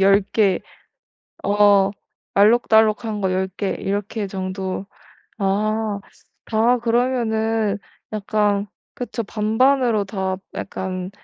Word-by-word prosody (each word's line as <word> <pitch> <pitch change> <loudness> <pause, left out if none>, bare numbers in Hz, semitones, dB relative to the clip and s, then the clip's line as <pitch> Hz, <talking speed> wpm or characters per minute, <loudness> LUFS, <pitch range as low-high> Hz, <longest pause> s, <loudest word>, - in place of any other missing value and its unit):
10 195 +1 +6
개 200 -4 +3 0.8
어 200 -1 +5 0.5
알록달록한 220 0 +4
거 190 - +1
10 190 +1 0
개 200 - -1
이렇게 205 +1 -2
정도. 190 0 -4 0.5
아. 210 +1 0 0.5
아 230 +3 +4
그러면은 225 -3 +1 0.3
약간 205 -1 0 0.3
그쵸 240 -3 -4
반반으로 225 +2 +2
다 190 -1 -2 0.2
약간 185 -1 -4
210 Hz, 165 characters per minute, -21 LUFS, 195-220 Hz, 0.8 s, 10